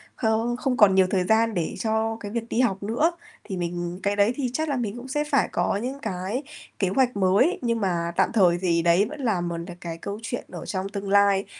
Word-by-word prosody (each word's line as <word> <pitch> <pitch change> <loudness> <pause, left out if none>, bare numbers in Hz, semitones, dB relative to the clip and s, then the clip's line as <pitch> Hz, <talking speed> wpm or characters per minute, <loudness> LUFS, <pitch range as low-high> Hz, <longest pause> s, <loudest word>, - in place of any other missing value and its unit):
không 225 +1 0
không 255 -2 -1
còn 195 -3 +6
nhiều 190 -1 +5
thời 185 -2 +1
gian 220 +3 +2
để 170 -4 -2
cho 220 0 0
cái 205 -2 -7
việc 235 0 -4
đi 235 - -1
học 200 -5 0
nữa, 245 +11 +1 0.3
thì 190 - -5
mình 175 +1 -3
cái 200 0 +1
đấy 205 +4 +3
thì 260 -4 -1
chắc 315 +2 -1
là 280 - 0
mình 235 -2 -3
cũng 250 +2 -8
sẽ 295 +3 -1
phải - - +3
có - - 0
những 260 +5 -4
cái 200 +6 -3 0.4
kế 190 -3 +1
hoạch 250 0 +1
mới, 200 - +3
nhưng 230 -2 0
mà 170 -3 -1
tạm - - +2
thời 180 -5 +4
thì 170 -2 +2
đấy 170 +4 +4
vẫn 300 -1 -8
là 215 -8 +1
một 170 -1 -3
là 175 +1 -7
cái 165 -1 -5
câu 200 +5 -6
chuyện 240 - -4
ở - - -7
trong 190 0 -3
tương 200 -1 -5
lai. 200 -1 +4
205 Hz, 245 wpm, -25 LUFS, 185-235 Hz, 0.4 s, còn